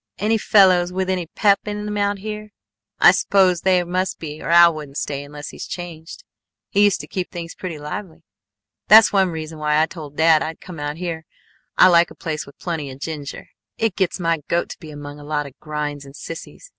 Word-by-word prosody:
"Any 220 Hz, +2 st, +1 dB
fellows 185 Hz, -4 st, +4 dB
with 190 Hz, 0 st, -1 dB
any 180 Hz, -3 st, -2 dB
pep 200 Hz, +4 st, +3 dB
in 210 Hz, 0 st, -4 dB
them 210 Hz, 0 st, -3 dB
out 205 Hz, 0 st, 0 dB
here? 215 Hz, +1 st, -6 dB, 0.5 s
I -, -, +8 dB
suppose 185 Hz, -3 st, +3 dB
there 185 Hz, -2 st, +3 dB
must 185 Hz, +1 st, -1 dB
be 155 Hz, -1 st, -7 dB
or -, -, -5 dB
Al 170 Hz, 0 st, +7 dB
wouldn't 150 Hz, -2 st, -8 dB
stay 140 Hz, -1 st, -3 dB
unless 145 Hz, 0 st, -9 dB
he's -, -, -8 dB
changed. 170 Hz, -2 st, -8 dB, 0.5 s
He 205 Hz, -, +3 dB
used 205 Hz, -2 st, +3 dB
to -, -, -11 dB
keep 185 Hz, -2 st, -4 dB
things 170 Hz, -2 st, -7 dB
pretty 180 Hz, -4 st, -6 dB
lively. 160 Hz, +3 st, -7 dB, 0.6 s
That's 215 Hz, 0 st, +8 dB
one 190 Hz, -2 st, +3 dB
reason 160 Hz, -1 st, -6 dB
why 150 Hz, 0 st, +2 dB
I 160 Hz, -, +4 dB
told 155 Hz, -4 st, -10 dB
dad 160 Hz, -1 st, +5 dB
I'd 160 Hz, 0 st, -4 dB
come 175 Hz, -4 st, -10 dB
out 145 Hz, +1 st, -4 dB
here. 165 Hz, -2 st, -5 dB, 0.5 s
I -, -, +8 dB
like 170 Hz, -1 st, +5 dB
a -, -, -13 dB
place 155 Hz, -2 st, -4 dB
with 140 Hz, -, -15 dB
plenty 160 Hz, -5 st, -4 dB
of 130 Hz, -, -9 dB
ginger. 145 Hz, -2 st, -6 dB, 0.3 s
It 225 Hz, -5 st, 0 dB
gets 190 Hz, -1 st, 0 dB
my 165 Hz, -2 st, +1 dB
goat 170 Hz, 0 st, 0 dB
to -, -, -9 dB
be 160 Hz, -, -11 dB
among 145 Hz, 0 st, -9 dB
a -, -, -11 dB
lot 150 Hz, 0 st, -2 dB
of 140 Hz, -, -10 dB
grinds 150 Hz, -1 st, -4 dB
and 140 Hz, 0 st, -13 dB
sissies! 165 Hz, -, -9 dB
170 Hz, 215 wpm, -21 LUFS, 150-190 Hz, 0.6 s, I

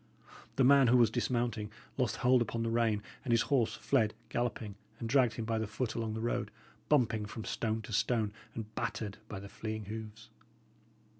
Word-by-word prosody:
The 135 Hz, -, +4 dB
man 135 Hz, 0 st, +7 dB
who 125 Hz, +2 st, +6 dB
was 115 Hz, -3 st, +5 dB
dismounting 120 Hz, -3 st, -1 dB, 0.2 s
lost 125 Hz, -4 st, 0 dB
hold 125 Hz, -1 st, +4 dB
upon 115 Hz, 0 st, -1 dB
the 115 Hz, -, -1 dB
rein, 115 Hz, -3 st, +2 dB, 0.2 s
and 130 Hz, -, -2 dB
his 115 Hz, 0 st, +4 dB
horse 120 Hz, -5 st, +3 dB
fled 110 Hz, -6 st, +1 dB
galloping, 120 Hz, -3 st, -2 dB, 0.2 s
and 115 Hz, -, -4 dB
dragged 125 Hz, -1 st, +4 dB
him 115 Hz, -, -3 dB
by 115 Hz, 0 st, 0 dB
the 110 Hz, -, -1 dB
foot 110 Hz, +2 st, -2 dB
along 110 Hz, -2 st, -2 dB
the 110 Hz, -, -3 dB
road, 120 Hz, -, -1 dB, 0.4 s
bumping 115 Hz, -7 st, +3 dB
from 110 Hz, +1 st, -7 dB
stone 110 Hz, -1 st, -1 dB
to 110 Hz, -, -7 dB
stone, 110 Hz, -1 st, +1 dB, 0.2 s
and 110 Hz, -1 st, -6 dB
battered 105 Hz, -1 st, -3 dB
by 100 Hz, -, -6 dB
the 100 Hz, -, -8 dB
fleeing 110 Hz, +1 st, -5 dB
hoofs. 110 Hz, +1 st, -8 dB
115 Hz, 190 wpm, -33 LUFS, 110-120 Hz, 0.4 s, man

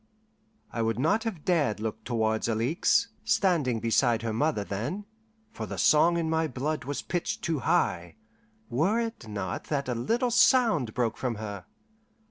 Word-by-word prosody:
I 115 Hz, -, -1 dB
would 115 Hz, -1 st, 0 dB
not 205 Hz, -, +1 dB
have 185 Hz, -10 st, -4 dB
dared 150 Hz, -, +1 dB
look 110 Hz, 0 st, -4 dB
towards 110 Hz, -2 st, 0 dB
Alixe, 155 Hz, -, +2 dB
standing 150 Hz, -, +2 dB
beside 115 Hz, +1 st, +2 dB
her 115 Hz, -1 st, -2 dB
mother 145 Hz, -2 st, 0 dB
then, 120 Hz, -, -4 dB, 0.5 s
for 225 Hz, -, -6 dB
the -, -, -6 dB
song 165 Hz, +3 st, +4 dB
in 165 Hz, -1 st, -1 dB
my 160 Hz, 0 st, +1 dB
blood 140 Hz, +1 st, -3 dB
was 145 Hz, +1 st, -4 dB
pitched 175 Hz, -2 st, -3 dB
too 160 Hz, -4 st, 0 dB
high, 85 Hz, -7 st, 0 dB, 0.5 s
were 165 Hz, -, +1 dB
it 225 Hz, -, -4 dB
not 100 Hz, -4 st, -4 dB
that 140 Hz, -3 st, -2 dB
a 125 Hz, -, 0 dB
little 235 Hz, -, 0 dB
sound 230 Hz, -, +4 dB
broke 115 Hz, -3 st, 0 dB
from 125 Hz, -3 st, -2 dB
her. 105 Hz, -1 st, -7 dB
130 Hz, 160 wpm, -28 LUFS, 115-170 Hz, 0.5 s, song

